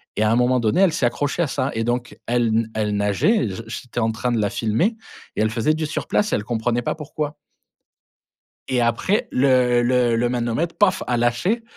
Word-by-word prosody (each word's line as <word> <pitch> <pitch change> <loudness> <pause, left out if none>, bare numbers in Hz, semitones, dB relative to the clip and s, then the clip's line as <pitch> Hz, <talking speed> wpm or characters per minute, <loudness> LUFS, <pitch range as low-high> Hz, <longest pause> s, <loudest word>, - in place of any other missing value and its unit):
et - - -1
à 110 - +3
un 115 - +3
moment 125 +1 +3
donné, 115 - +2
elle 180 -5 +4
s'est 120 - +2
accrochée 145 +6 -2
à 165 - +1
ça 135 +1 -2
et 115 0 -1
donc 120 +1 -3
elle 120 -1 +1
na 115 0 +1
elle 105 -1 0
nageait 105 - +2
et - - -2
j 105 +4 -6
j'étais 120 +2 -6
en 110 0 +1
train 120 +2 -2
de 115 - +1
la 105 -2 0
filmer 120 - 0 0.4
et - - 0
elle 110 - +2
faisait 115 +7 +1
du 155 -1 -2
surplace, 210 +6 -1
et - - +4
elle 105 - -2
comprenait 120 +1 -1
pas - - -1
pourquoi. 150 0 -5 1.3
Et 125 -2 +1
après 120 - +1
le 125 -2 +3
le 120 -1 +2
le 120 +1 +1
manomètre, 120 +7 -1
paf, 195 -3 +3
a 125 - +1
lâché 120 - 0
120 Hz, 220 wpm, -22 LUFS, 115-145 Hz, 1.3 s, elle